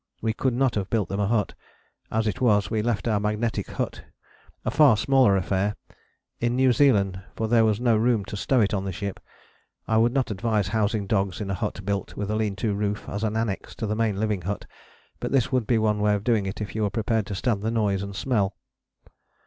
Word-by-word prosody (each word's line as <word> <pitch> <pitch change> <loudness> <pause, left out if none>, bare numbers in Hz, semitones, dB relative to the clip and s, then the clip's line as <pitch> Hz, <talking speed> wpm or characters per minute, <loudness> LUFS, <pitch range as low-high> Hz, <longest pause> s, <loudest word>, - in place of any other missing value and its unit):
We 110 0 -1
could 125 +2 0
not 130 -1 +2
have 100 -2 -2
built 110 -6 0
them 100 - -2
a 100 - +1
hut; 110 -1 0 0.6
as 110 0 0
it 110 +5 -2
was, 105 -5 +3
we 110 -2 +1
left 115 0 -1
our 110 -3 +2
magnetic 105 +2 -1
hut, - - -4 0.6
a - - 0
far 140 -8 +6
smaller 130 -4 +4
affair, 95 +2 0 0.6
in 120 +1 0
New 130 -1 +4
Zealand, 100 -9 +3
for 110 - -1
there 115 0 +4
was 110 -1 +2
no 120 -2 +3
room 110 -2 +2
to 105 - -6
stow 125 +5 +2
it 105 - +1
on 95 -2 0
the 95 - -3
ship. 100 +1 -5 0.7
I 110 - +2
would 115 +2 +4
not 130 -3 0
advise 105 -1 0
housing 105 -1 0
dogs 95 -2 0
in 100 -2 -3
a - - 0
hut 105 +1 -3
built 100 0 -3
with 105 0 -2
a - - 0
lean 110 -2 -1
to 105 +1 -1
roof 105 0 -2
as 100 +2 -4
an 110 -1 0
annexe 110 -4 -3
to - - -3
the 105 0 -1
main 110 -3 0
living 105 -3 0
hut, 100 +4 -4 0.5
but - - -3
this 135 -2 +2
would 125 -5 +1
be 120 - +3
one 105 -1 +1
way 105 0 +3
of 100 - -3
doing 110 -4 +1
it 95 +3 -5
if 105 - -5
you 110 - -1
are 105 - +1
prepared 110 -1 -1
to 100 - -4
stand 105 0 0
the 110 - -1
noise 105 -4 0
and 100 0 -6
smell. 100 -4 0
105 Hz, 235 wpm, -25 LUFS, 100-115 Hz, 0.7 s, far